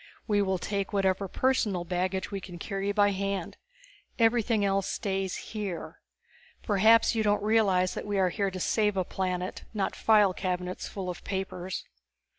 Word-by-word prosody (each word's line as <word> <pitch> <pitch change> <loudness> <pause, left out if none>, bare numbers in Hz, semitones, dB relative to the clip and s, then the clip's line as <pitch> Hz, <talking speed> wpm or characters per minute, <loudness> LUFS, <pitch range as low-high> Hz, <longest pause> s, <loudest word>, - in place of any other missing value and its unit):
We 205 -2 +3
will 190 -1 +1
take 200 +2 -3
whatever 195 0 +1
personal 210 -6 +1
baggage 185 +3 -2
we 200 -1 -4
can 180 -2 -9
carry 195 +3 -2
by 205 0 +3
hand; 195 -2 -3 0.6
everything 225 -2 +3
else 195 -1 +1
stays 195 -2 -2
here. 205 -6 -6 0.6
Perhaps 220 +3 +5
you 225 - +1
don't 205 -1 +2
realize 200 -4 +3
we 205 -1 -3
are 185 -1 +3
here 195 +3 -1
to 185 -1 -6
save 210 +1 +1
a 185 - +2
planet 185 0 -3
not 195 -2 -1
file 210 -4 +4
cabinets 180 -1 -3
full 195 -2 -5
of 180 - -5
papers." 190 -1 -4
195 Hz, 155 wpm, -28 LUFS, 185-205 Hz, 0.6 s, Perhaps